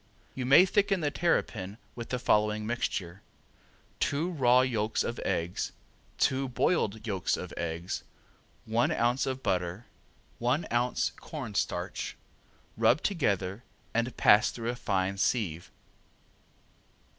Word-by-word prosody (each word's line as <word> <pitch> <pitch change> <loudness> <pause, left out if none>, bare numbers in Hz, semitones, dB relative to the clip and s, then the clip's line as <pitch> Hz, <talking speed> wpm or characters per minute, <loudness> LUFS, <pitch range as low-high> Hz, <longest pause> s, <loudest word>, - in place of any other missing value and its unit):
You 130 -1 -3
may 140 +8 +8
thicken 195 0 +2
the 145 -1 0
terrapin 105 - 0 0.2
with 120 -1 -7
the 125 - -1
following 105 -3 +2
mixture: 100 -6 -3 0.8
Two 155 +6 0
raw 125 -5 +4
yolks 110 -4 0
of 120 - -4
eggs, 85 +2 -2 0.4
two 135 0 +1
boiled 110 - 0
yolks 95 -5 0
of 90 - -7
eggs, 85 +1 -3 0.6
one 115 +2 +1
ounce 120 +4 +1
of 130 0 -3
butter, 90 +3 -1 0.5
one 130 +7 +1
ounce 120 +1 +1
corn 135 -9 -7
starch. - - -2 0.6
Rub 130 - +3
together 100 - 0 0.3
and 115 +1 -1
pass 105 +3 +6
through 115 -1 -4
a - - -6
fine 95 -4 -1
sieve. 90 -8 0
120 Hz, 120 wpm, -29 LUFS, 100-130 Hz, 0.8 s, may